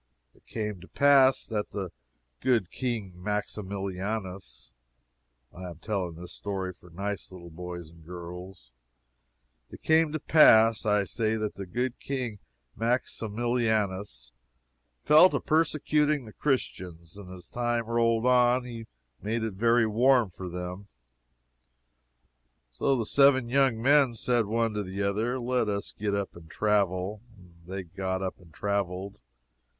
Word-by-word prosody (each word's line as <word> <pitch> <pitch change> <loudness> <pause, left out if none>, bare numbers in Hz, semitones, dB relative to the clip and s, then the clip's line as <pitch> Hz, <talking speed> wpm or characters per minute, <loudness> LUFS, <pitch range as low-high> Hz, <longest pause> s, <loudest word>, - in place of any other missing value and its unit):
It - - -28
came 105 -4 -4
to 95 - -13
pass 140 -2 +4
that 105 -2 -3
the 95 -4 -5 0.5
good 120 -8 +1
King 115 -7 -3
Maximilianus, 100 - -4 0.8
(I 90 0 -8
am 85 - -10
telling 95 -3 -3
this 90 +1 -9
story 95 -2 -4
for 90 0 -19
nice 100 +4 -5
little 85 -2 -11
boys 85 -1 -8
and 85 -1 -17
girls,) 90 -4 -9 1.0
it - - -12
came 160 -1 +4
to 155 - -2
pass, 115 -8 +5
I 105 -1 +3
say, 110 +2 -1
that 110 -1 -2
the 100 -1 -7
good 125 +6 -2
King 125 -6 -4 0.4
Maximilianus 110 - -1 0.7
fell 155 +5 +7
to - - -1
persecuting 150 -3 +1
the 110 - -12
Christians, 90 - -3
and 100 -3 -11
as 90 -2 -10
time 120 -1 -1
rolled 115 0 +1
on 125 0 +4
he 115 -2 -8 0.3
made 110 +2 -2
it 110 -2 -2
very 115 +3 +3
warm 120 0 +3
for 90 +1 -7
them. 90 +3 -6 1.9
So 135 - +1
the 115 - -1
seven 130 -1 +4
young 130 -3 +3
men 135 0 +4
said 120 -1 +1
one 115 +1 0
to 105 - -2
the 95 +1 -4
other, 110 +6 0
let 125 -2 0
us 100 0 -3
get 100 -1 -2
up 100 -1 -3
and 85 -2 -13
travel. 100 0 0 0.2
And 85 -2 -19
they 95 +1 -5
got 95 +2 -3
up 95 - -4
and 90 -3 -18
traveled. 100 0 -3
105 Hz, 140 wpm, -28 LUFS, 95-120 Hz, 1.9 s, fell